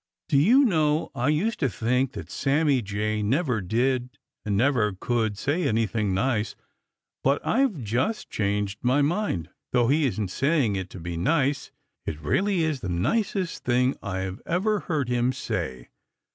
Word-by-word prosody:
"Do 140 -4 +4
you 245 - +6
know, 155 -7 +1
I 125 -1 -1
used 170 +10 +1
to 135 - +1
think 125 +6 0
that - - -8
Sammy 140 -1 +2
Jay 105 +1 -2
never 125 - +1
did 125 +6 0 0.3
and 100 -2 0
never 115 -4 +2
could 110 -4 0
say 160 - 0
anything 110 -2 0
nice, 110 +2 0 0.7
but 140 +2 +3
I've 225 - +1
just 125 - -1
changed 100 0 -1
my 130 +3 +3
mind. 155 - -1 0.2
Though 120 -1 +3
he 145 +1 +3
isn't 110 -5 -2
saying 135 - +1
it 95 -1 -4
to 95 - -9
be 85 0 -5
nice, 140 - +1 0.4
it 75 - -3
really 185 - +1
is 155 -4 0
the 95 - -5
nicest 185 - -1
thing 125 +2 +2
I've 95 -1 -4
ever 205 +5 +1
heard 155 -8 -2
him 125 +1 +1
say. 75 - -4
125 Hz, 160 wpm, -26 LUFS, 105-150 Hz, 0.7 s, you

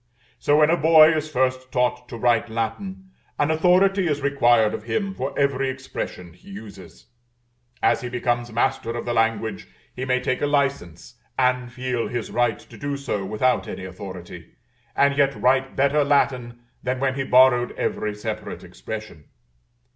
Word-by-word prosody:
So, 145 - +3
when 155 +1 +5
a 170 - +3
boy 160 0 +6
is 155 0 -2
first 130 -2 -1
taught 125 -1 0
to 120 - -7
write 115 -1 +2
Latin, 185 - -4 0.3
an 145 +2 +1
authority 185 +3 +3
is 145 -2 0
required 120 -6 +3
of 105 - -6
him 195 - -2
for 135 -7 -5
every 135 -1 +1
expression 130 -9 -6
he 90 - -18
uses; 100 -3 -11 0.8
as - - +3
he 125 - -5
becomes 120 -1 -1
master 120 0 -1
of - - -5
the 120 - -1
language 115 -1 -1 0.3
he 130 - -5
may 130 0 +1
take 130 0 -2
a 145 - +1
license, 135 - -2 0.2
and 125 -1 +1
feel 125 -1 -2
his 120 -2 -4
right 120 -2 +1
to - - -15
do 140 0 -3
so 130 -8 -3
without 110 +6 0
any 95 - -6
authority, 90 -2 -9 0.4
and 140 +1 +3
yet 140 -1 +3
write 130 +1 +2
better 140 +2 +3
Latin 130 -4 0 0.2
than 130 0 -2
when 135 0 +1
he 135 0 -2
borrowed 125 -1 +4
every 105 -1 -2
separate 110 0 -6
expression. 110 -9 -8
125 Hz, 165 wpm, -23 LUFS, 115-140 Hz, 0.8 s, boy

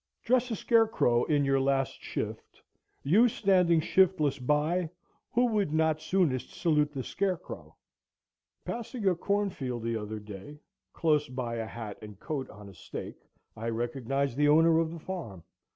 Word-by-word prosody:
Dress 250 +1 +2
a 225 - -1
scarecrow 220 - +3
in 145 -3 +2
your 135 0 +2
last 135 0 0
shift, - - -5 0.4
you 205 - +5
standing 185 -6 +3
shiftless 155 -5 +2
by, 150 +6 +1 0.4
who 245 +1 +3
would 210 -8 +1
not 160 -1 +2
soonest 155 -6 0
salute 150 -4 +2
the 135 -3 -4
scarecrow? 190 +3 -4 0.9
Passing 235 -2 -4
a 185 - +5
cornfield 175 - -2
the 115 0 -1
other 110 0 -5
day, 105 +7 -10 0.3
close 150 -4 +1
by 125 -2 -3
a 115 -1 -3
hat 110 -3 -7
and 105 -2 -11
coat 140 -4 -4
on 105 -1 -12
a 100 - -12
stake, 85 - -8 0.3
I 115 +2 -4
recognized 120 +3 -2
the 145 0 +4
owner 160 +2 +5
of 165 -1 +1
the 170 - -7
farm. 155 - -7
150 Hz, 150 wpm, -29 LUFS, 120-185 Hz, 0.9 s, you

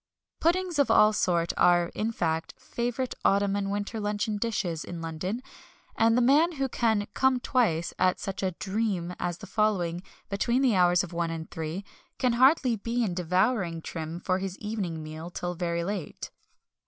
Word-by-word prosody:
Puddings 350 -1 +1
of 285 - +3
all 215 0 +6
sorts 170 -4 +1
are, 175 -1 +4
in 220 +2 -2
fact, 165 -6 -2
favourite 245 +2 -3
autumn 200 0 +3
and 200 -1 -1
winter 205 +2 -3
luncheon 210 +1 -1
dishes 195 -8 -2
in 175 - -7
London, 165 +9 -4 0.5
and 225 +1 +4
the 250 - +4
man 305 +7 +4
who 275 -3 -1
can 220 -4 +1
"come 265 -1 +3
twice" 210 -11 +1
at 185 0 +2
such 195 -1 -4
a 190 -2 -1
"dream" 190 -2 -2
as 175 -1 -2
the 200 - -10
following, 190 -5 0 0.3
between 235 +6 +1
the 245 -6 +3
hours 180 -1 +4
of 180 -2 -8
one 170 0 -1
and 165 0 -6
three, 165 +5 -4 0.3
can 250 -2 +2
hardly 255 0 +4
be 235 +3 -1
in 195 -5 -1
devouring 180 0 +1
trim 160 +1 -5
for 185 +1 0
his 190 0 -4
evening 195 -7 -4
meal 155 +2 -7
till 175 0 -4
very 170 -1 -2
late. 195 -2 -5
195 Hz, 175 wpm, -28 LUFS, 175-230 Hz, 0.5 s, all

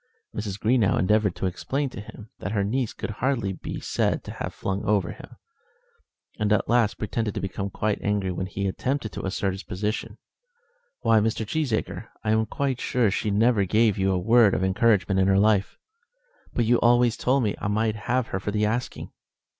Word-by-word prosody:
Mrs. 105 -2 -4
Greenow 110 -2 +3
endeavoured 105 0 +2
to - - -3
explain 135 +10 -2
to 105 - -7
him 105 +1 -12
that 100 - -4
her 100 -2 +1
niece 120 +3 -1
could - - -5
hardly 115 -3 -1
be - - -6
said - - 0
to - - -7
have - - -5
flung 95 0 -3
him - - -3
over, 100 -4 +1 1.2
and 105 -1 +1
at 105 - +2
last 115 -3 +3
pretended 105 0 -2
to - - -1
become 95 +1 -3 0.3
angry 100 -2 0
when 90 +1 -3
he 100 0 -3
attempted 115 +4 -2
to - - -6
assert 95 0 -1
his 95 +1 -6
position. 105 +4 -4 0.8
"Why, 115 -3 +4
Mr. 110 +1 0
Cheesacre, 115 -4 -2 0.2
I 110 - +1
am 110 0 +2
quite 135 -3 -2
sure 120 -5 +1
she 105 - -1
never 105 +1 +3
gave 110 +1 +2
you 95 0 +2
a 95 - +1
word 110 +2 +4
of - - -1
encouragement 95 0 +2
in 95 - +3
her 95 0 +4
life." 100 -1 +2 0.7
"But 120 - 0
you 120 +1 +3
always 120 0 +4
told 130 +1 +1
me 105 - +1
I - - -1
might 110 +1 +1
have 125 -1 +1
her 95 - -2
for 100 - -4
the 105 +1 +1
asking." 115 +4 -3
105 Hz, 195 wpm, -25 LUFS, 100-115 Hz, 1.2 s, Why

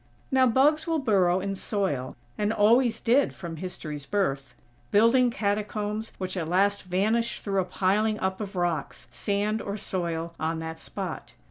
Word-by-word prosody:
Now 260 -1 +5
bugs 295 +7 +3
will 325 -1 +1
burrow 190 - +2
in 195 +1 -2
soil, 190 - -2 0.2
and 210 0 0
always 225 +2 +4
did, 255 +4 +2
from 170 -3 -7
History's 150 -5 -6
birth; 140 -10 -1 0.3
building 230 +4 +5
catacombs 210 -1 -2
which 185 0 -4
at 165 -3 -3
last 200 +3 +2
vanish 215 +6 0
through 195 -2 0
a - - -3
piling 210 +4 +1
up 190 +2 -2
of 200 -1 -6
rocks, 170 -8 -2
sand 205 - -1
or 200 +1 -4
soil 170 -4 -3
on 160 +1 -1
that 160 0 -6
spot. - - -6
200 Hz, 155 wpm, -27 LUFS, 175-220 Hz, 0.3 s, Now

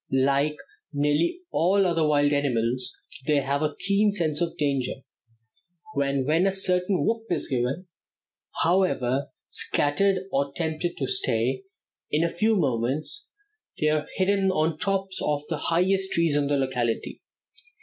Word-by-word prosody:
Like 140 +3 +2 0.3
nearly 150 - +1
all 195 +4 +3
other 170 -3 +1
wild 145 -1 +3
animals, 125 -3 0 0.3
they 150 - +3
have 140 +1 0
a 150 -1 -1
keen 200 +2 +2
sense 160 -6 -1
of 170 0 -2
danger, 140 -4 0 1.0
and 140 -1 0
when 165 +6 +3
a - - +2
certain 185 0 +1
whoop 225 0 0
is - - -1
given, 130 +7 -1 0.8
however 145 -7 +1 0.2
scattered 185 +6 +1
or 140 0 0
tempted 165 +1 -2
to - - -1
stay, 390 0 0 0.4
in 155 +2 +1
a 170 - -1
few 220 +5 +2
moments 140 - 0 0.5
they 155 - +2
are 155 0 0
hidden 195 0 +2
on 160 -3 +2
the 155 - -13
tops 195 +1 -1
of 145 -1 0
the 165 - -1
highest 190 +3 +1
trees 165 -3 +2
in 145 -1 +1
the 145 0 +1
locality. 125 -4 -2
155 Hz, 145 wpm, -25 LUFS, 140-185 Hz, 1.0 s, all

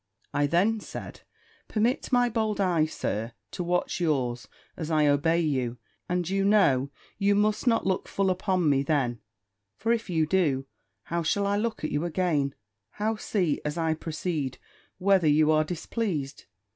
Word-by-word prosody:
I 145 0 +2
then 195 +8 +2
said, - - -8 0.5
"Permit 230 +6 0
my 245 -1 +4
bold 220 -3 -1
eye, 175 -5 +3
Sir, 115 -6 -3 0.2
to 180 - -4
watch 175 +1 0
yours, 130 -7 0 0.3
as 160 - -5
I 155 -2 +3
obey 145 +4 +3
you; 130 -6 -1 0.3
and 180 -1 0
you 195 +1 0
know 165 -11 +4 0.3
you 200 0 +3
must 210 +3 +1
not 230 -2 +3
look 190 -1 0
full 195 -1 +1
upon 185 -2 0
me 140 -2 +3
then; 135 -5 0 0.6
for 225 - -1
if 230 -3 -3
you 160 -3 +2
do, 150 -6 +1 0.4
how 170 0 -2
shall 200 +5 +1
I 200 0 +1
look 220 -1 -2
at 155 - -2
you 145 +2 0
again; 160 -5 0 0.4
how 215 +2 -1
see, 185 -7 -1
as 150 +2 -3
I 160 -1 +1
proceed, 155 -3 -3 0.4
whether 190 -3 +3
you 150 +1 +4
are 155 0 +4
displeased? 165 - -3
170 Hz, 165 wpm, -27 LUFS, 150-200 Hz, 0.6 s, my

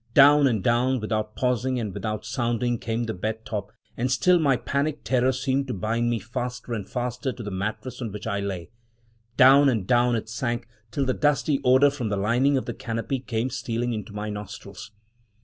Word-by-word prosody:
Down 145 +1 +7
and 110 -7 0
down, 125 +2 +2
without 110 -1 -2
pausing 125 +1 0
and 105 -5 -3
without 110 +1 -4
sounding, 120 -1 -1
came 115 +1 -2
the 110 -1 -3
bed 110 +4 -4
top, 105 -2 -4 0.2
and 125 +2 -1
still 180 +7 +4
my 140 -5 +3
panic 140 +5 -2
terror 130 0 +2
seemed 135 +1 -1
to 125 - -3
bind 115 +5 0
me 120 - +1
faster 120 +3 -5
and 105 -4 -4
faster 125 +1 -2
to 120 -1 -8
the 105 - -5
mattress 110 +6 -4
on 115 -3 -3
which 105 +1 -7
I 100 -2 -1
lay 95 -3 -4 0.3
— 115 0 -38
down 135 +2 +7
and 110 -7 0
down 120 +2 +3
it 110 - -3
sank, 120 0 -3 0.2
till 140 +3 -1
the 130 - +1
dusty 145 0 +1
odor 130 +3 +5
from 130 -6 -3
the 100 - -1
lining 120 +8 +2
of 130 - -2
the 120 - -4
canopy 115 +4 -3
came 120 0 -2
stealing 120 0 -2
into 110 -1 -5
my 105 +1 -4
nostrils. 100 -1 -8
120 Hz, 200 wpm, -25 LUFS, 110-130 Hz, 0.3 s, Down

